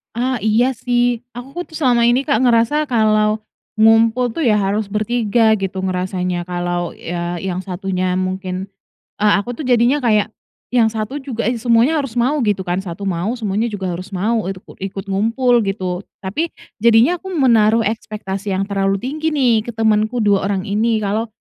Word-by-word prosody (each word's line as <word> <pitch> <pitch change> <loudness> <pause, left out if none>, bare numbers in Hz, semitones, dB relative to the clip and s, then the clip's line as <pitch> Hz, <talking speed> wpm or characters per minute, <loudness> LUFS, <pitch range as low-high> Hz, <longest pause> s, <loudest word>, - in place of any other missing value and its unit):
Ah 255 +2 0
iya 235 +4 +2
sih, 245 0 0
aku 245 +1 -9
ku 350 - -2
tuh 315 - -6
selama 245 -5 +3
ini, 245 +4 +2
Kak, 280 -3 +2
ngerasa 245 +5 +3
kalau 215 -5 +2 0.4
ngumpul 225 +3 +4
tuh 330 - -1
ya 215 -5 +3
harus 200 +1 -1
ber-3 220 +1 +2
gitu 195 -2 -4
ngerasanya, 180 -1 -2
kalau 175 -1 -3
ya 175 0 -4
yang 185 0 -3
1-nya 185 -1 -2
mungkin, 185 0 -3 0.5
eee, 210 0 +3
aku 240 - -7
tuh 300 - -4
jadinya 245 +3 +3
kayak 215 -5 +2 0.4
yang 240 -2 +4
1 220 +5 -3
juga, 260 -5 -4
eee, 240 +2 0
is 235 - -11
semuanya 240 +7 +4
harus 275 -6 -4
mau 250 +5 +1
gitu 210 -7 0
kan, 180 -1 -2
1 190 0 -6
mau 190 +3 -1
semuanya 215 -2 -1
juga 200 -5 -3
harus 185 +3 -6
mau 215 +4 0
itu 190 0 -5
kut - - -16
ikut 195 0 -5
ngumpul 230 +5 +2
gitu. 185 -1 -3 0.2
Tapi 295 - -3 0.2
jadinya 235 - +4
aku 380 - -15
menaruh 230 -6 +4
ekspektasi 205 -2 -3
yang 190 - 0
terlalu 195 -1 -1
tinggi 305 +5 -2
nih 240 -6 +2
ke 235 - -6
temenku 220 +1 +1
2 200 -2 +2
orang 195 -2 -1
ini, 215 +2 0
kalau 210 +3 -1
215 Hz, 180 wpm, -18 LUFS, 195-240 Hz, 0.5 s, ngumpul